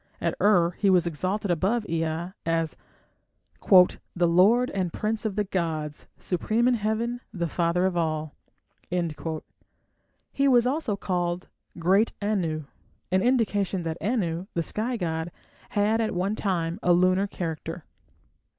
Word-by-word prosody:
At - - 0
Ur 180 -5 +4
he 200 - +3
was 180 -2 +4
exalted 185 +5 -1
above 205 +7 +1
Ea 165 +2 -2
as 165 -1 0 0.9
"the 180 -2 +4
lord 205 +9 +4
and 185 -3 -1
prince 215 +3 -2
of 210 -3 -1
the 210 - +1
gods, 160 -6 -3
supreme 220 +6 0
in 250 - +4
heaven, 230 +2 -1
the 175 -5 -2
Father 170 +2 +1
of 190 -1 0
all"; 155 -3 -1 2.0
he 275 0 +2
was 245 -3 +5
also 255 -5 0
called 175 -2 -2 0.3
"great 190 +6 +3
Anu", 180 -7 -1 0.5
an 185 0 +3
indication 205 -6 +1
that 165 0 -4
Anu, 185 -6 -1
the 170 - +1
sky 235 +8 -2
god, 165 -3 -2 0.4
had 210 +2 +2
at 220 -4 -1
one 190 +4 0
time 175 -3 -1
a 175 - +4
lunar 185 +3 +3
character. 165 -5 -5
185 Hz, 135 wpm, -26 LUFS, 170-215 Hz, 2.0 s, was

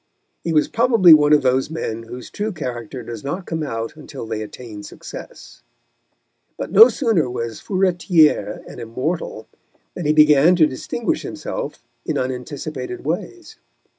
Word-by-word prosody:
He 170 - -2
was 155 -2 +3
probably 225 -7 +6
one 150 -1 +5
of 150 -2 +5
those 130 +2 +2
men 115 -8 -4
whose 120 +2 -10
true 215 +1 -3
character 125 - -6
does 115 -1 -8
not 175 +7 -4
come 160 -1 -3
out 115 -5 -4
until 150 -5 -9
they 110 -1 -4
attain 110 -1 -9
success. 100 - -11 1.0
But - - -5
no 220 +6 +9
sooner 220 - +1
was 115 -2 -5
Furetière 180 -4 +2
an - - -10
Immortal 130 +9 -4 0.5
than 175 -4 -4
he 150 - +4
began 150 +2 +6
to 165 -3 +5
distinguish 130 -4 -2
himself - - -6 0.2
in - - -2
unanticipated 130 0 -5
ways. 335 - -4
150 Hz, 145 wpm, -20 LUFS, 125-175 Hz, 1.0 s, no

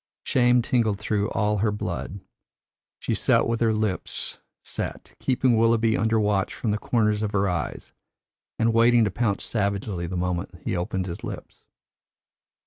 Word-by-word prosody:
Shame 125 -1 +3
tingled 115 -5 +1
through 105 0 -1
all 105 0 0
her 105 +1 +2
blood; 100 -1 -4 0.8
she - - -2
sat - - +3
with 115 0 -1
her 115 -1 +4
lips 110 -3 -2 0.2
set, - - -5
keeping 130 -2 +2
Willoughby 115 0 +3
under 110 0 +2
watch 105 -2 0
from 110 - -1
the 105 - -1
corners 105 -3 +1
of 105 -1 -2
her 100 0 +2
eyes, 85 -4 -3 0.6
and 115 0 +2
waiting 115 +1 +5
to 105 - +1
pounce 105 -1 -1
savagely 100 -4 -2
the 90 +1 -3
moment 90 +1 -2
he - - -1
opened 90 +1 -2
his 85 -2 -6
lips. - - -8
105 Hz, 155 wpm, -25 LUFS, 95-115 Hz, 0.8 s, waiting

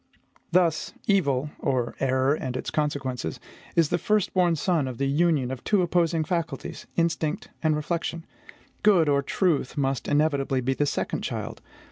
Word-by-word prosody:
Thus, 170 -3 +2
evil 145 -8 +2
or 125 -3 0
error 130 +1 +2
and 130 -4 -3
its - - -4
consequences 140 -5 -2 0.4
is 165 -3 +4
the 175 - +1
firstborn 185 -3 +2
son 160 -2 +1
of 125 -2 -5
the 140 - 0
union 145 -2 +2
of 130 -2 -6
two 205 -4 +2
opposing 170 -2 +2
faculties, 170 +1 -4
instinct 165 -2 0
and 155 -2 +2
reflection; 165 +2 -3 0.6
good, 190 -7 +5
or 140 -1 +3
truth, 150 -3 0
must 135 -2 0
inevitably 145 -3 +1
be 130 +2 0
the 145 +2 0
second - - -2
child. - - -4
150 Hz, 150 wpm, -26 LUFS, 135-170 Hz, 0.6 s, good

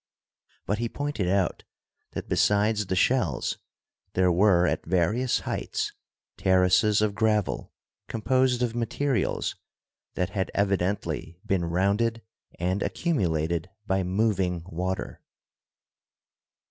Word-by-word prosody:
But 105 +2 -1
he 120 0 -1
pointed 145 -10 -2
out 95 -1 +1 0.5
that - - -5
besides 105 0 +2
the 95 - 0
shells - - +1 0.5
there 90 -1 +3
were 90 -1 +4
at - - 0
various 100 +9 +1
heights - - -2 0.5
terraces 95 +3 +4
of 105 -1 +1
gravel 105 -1 0 0.4
composed 125 +2 +1
of 120 -2 0
materials 120 +3 -1 0.6
that 90 0 -1
had 95 +1 -1
evidently 100 -3 -1
been 95 -4 +1
rounded 100 +7 +1 0.3
and 90 +3 -1
accumulated 85 - 0 0.2
by 95 -2 +1
moving 95 -2 0
water. 95 +2 -4
100 Hz, 105 wpm, -27 LUFS, 90-110 Hz, 0.6 s, were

